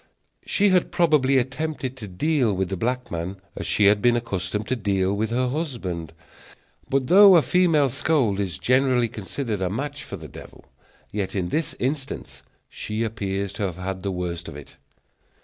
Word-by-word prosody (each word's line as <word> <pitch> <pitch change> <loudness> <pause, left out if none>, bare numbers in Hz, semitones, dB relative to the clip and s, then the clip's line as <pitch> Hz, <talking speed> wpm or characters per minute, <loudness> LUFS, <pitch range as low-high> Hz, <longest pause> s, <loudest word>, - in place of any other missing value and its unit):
She 205 0 +3
had 185 -2 +2
probably 150 -6 +3
attempted 135 0 -2
to 110 -4 -7
deal 120 - +1
with 95 0 -1
the 95 - -2
black 125 +6 -2
man 85 +3 -4 0.2
as - - -5
she 105 - +2
had 105 +1 +5
been 120 +1 +4
accustomed 105 -3 -3
to 130 - +1
deal 100 -3 0
with 105 +2 -1
her 125 +2 0
husband; 120 - -4 0.8
but 135 -1 +1
though 195 +4 +8
a 165 - +6
female 165 -6 +3
scold 125 -6 +1
is 95 -7 -2
generally 130 - +2
considered 110 0 -4
a 90 - 0
match 140 +7 -4
for 100 - -7
the 80 -3 -10
devil, - - -13 0.5
yet 100 -2 -3
in 90 -3 -1
this 155 - -2
instance 135 +2 -4 0.3
she 110 +2 -4
appears 100 -3 -3
to - - -7
have 90 -3 -2
had 95 +1 -4
the 100 - -2
worst 85 -2 -4
of 80 - -8
it. 75 -1 -11
110 Hz, 180 wpm, -24 LUFS, 95-135 Hz, 0.8 s, though